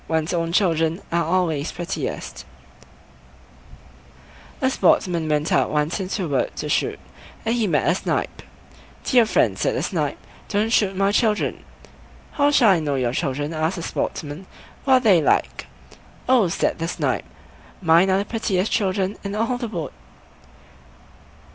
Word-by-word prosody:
ONE'S 160 +1 -1
OWN 165 -1 -1
CHILDREN 165 -3 +1
ARE 170 0 +1
ALWAYS 165 -3 0
PRETTIEST 175 +1 -5 2.2
A 260 - +2
sportsman 170 -9 +2
went 150 0 0
out - - +3
once 150 +5 0
into 190 0 -3
a - - -3
wood 140 -3 0
to - - -4
shoot, - - 0 0.5
and 225 - +1
he 235 -3 +1
met 155 -5 +1
a 170 - +4
Snipe. 185 - -2 0.6
"Dear 245 -4 +4
friend", - - +1
said - - 0
the - - -1
Snipe, - - -2 0.3
"don't 215 +2 0
shoot 195 -4 +2
my 195 +1 +2
children!" 215 0 0 0.7
"How 285 0 +2
shall 250 -8 +5
I 180 - +3
know 145 -3 -1
your 125 -2 0
children?" 145 +1 -2
asked 160 +3 -1
the 170 - -5
Sportsman; 155 +4 -4 0.4
"what 265 - +4
are - - +5
they 195 -8 +5
like?" - - 0 0.6
"Oh!" 250 -7 +4
said 170 - -1
the 165 - -2
Snipe, - - -1 0.5
"mine 170 +1 +4
are 190 - +3
the 200 - -1
prettiest 205 -4 -1
children 195 -1 0
in 200 0 -4
all 230 +3 -1
the 240 - -3
wood." 170 -10 -5
185 Hz, 155 wpm, -22 LUFS, 160-210 Hz, 2.2 s, shall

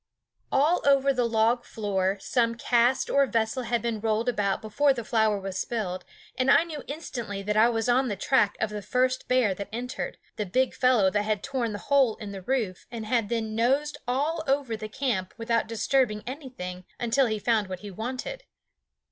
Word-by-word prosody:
All 300 +6 +3
over 275 -1 +4
the 245 -2 +1
log 230 +2 +2
floor 195 -2 -1
some 230 +2 +1
cask 240 +2 +2
or 280 0 +3
vessel 230 +1 0
had 235 -1 -1
been 230 -2 -1
rolled 220 +2 0
about 205 -5 +1
before 275 +6 +2
the 235 -3 -5
flour 220 -2 +2
was 190 -1 -4
spilled, 185 -6 -3 0.3
and 255 +1 +1
I 320 - +6
knew 315 -4 -7
instantly 240 -9 -5
that 210 +1 -1
I 220 +2 +6
was 225 -1 -1
on 255 +2 +3
the 205 - -2
track 210 +1 +2
of 215 - -1
the 210 0 -4
first 255 +4 0
bear 250 -6 +3
that 200 +2 -7
entered, 245 +3 -4 0.2
the 210 - -1
big 255 +7 +1
fellow 250 -7 +3
that 210 - +1
had 210 -1 -1
torn 255 -5 -2
the 205 - -4
hole 265 -1 +2
in 210 -3 -8
the 195 -1 -7
roof 210 -4 -2
and 230 -2 -6
had 225 -2 0
then 225 -2 -2
nosed 270 +7 +1
all 295 +6 0
over 270 -4 +1
the 215 0 -7
camp 215 -7 -2
without 230 -1 0
disturbing 230 -1 +1
anything 245 -10 -7 0.2
until 245 +3 +2
he 220 -1 -1
found 215 -1 +1
what 185 -1 -6
he 205 -1 -8
wanted. 255 - -5
230 Hz, 195 wpm, -27 LUFS, 210-260 Hz, 0.3 s, I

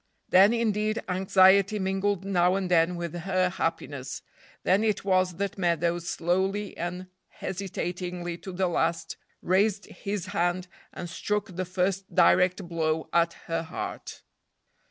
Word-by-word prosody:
Then, 195 +3 +7
indeed, 215 -2 0
anxiety 190 +2 +4
mingled 195 0 -1
now 180 -1 +3
and 190 -2 -2
then 170 +1 +3
with 170 -2 -4
her 185 +1 0
happiness. 165 -6 -4 0.4
Then 195 +4 +3
it 215 -2 0
was 185 -2 +2
that 200 +2 -3
Meadows, 170 -1 0
slowly 190 +4 -1
and 180 +2 -4 0.2
hesitatingly 180 -2 -5
to 190 - -8
the 185 +1 0
last, 170 -1 -1 0.3
raised 200 +3 +2
his 200 -3 -5
hand 175 +1 0 0.2
and 175 - -6
struck 195 +2 -3
the 185 +1 -2
first 190 +2 -2
direct 180 0 +4
blow 160 -2 -1
at 170 0 +3
her 165 0 -1
heart. 165 - -7
185 Hz, 135 wpm, -27 LUFS, 175-195 Hz, 0.4 s, Then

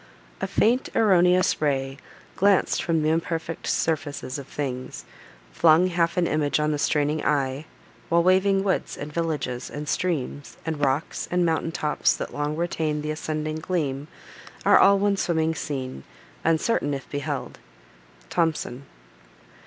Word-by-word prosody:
A - - 0
faint 245 +4 +2
erroneous 180 -5 +4
ray, 135 -2 0 0.4
Glanc'd 200 -1 +3
from 165 -2 0
th' - - 0
imperfect 165 +1 -1
surfaces 145 -4 -1
of 140 - -9
things, 130 -3 -5 0.5
Flung 165 +3 +5
half 170 0 0
an 180 - +3
image 150 -2 +1
on 150 0 +1
the 150 - -1
straining 150 +1 +1
eye; 140 +1 0 0.4
While 170 0 +4
waving 190 +2 +3
woods, 195 -2 -1
and 145 +1 -7
villages, 150 -7 -2
and 150 +1 -6
streams, 150 -5 -2
And 160 -3 -3
rocks, 135 +3 -1
and 180 0 +2
mountain 165 0 0
tops, 150 -2 +1
that - - -6
long 145 +1 -2
retain 155 -3 -1
The 150 - -2
ascending 155 0 -3
gleam, 150 -5 -2 0.6
are - - +7
all 200 0 +6
one 200 0 +1
swimming 160 -3 +1
scene, 130 - -5 0.4
Uncertain 160 -2 +1
if 135 - -8
beheld. 145 -2 -4 0.7
THOMSON. 155 -6 -1
155 Hz, 140 wpm, -25 LUFS, 145-170 Hz, 0.7 s, are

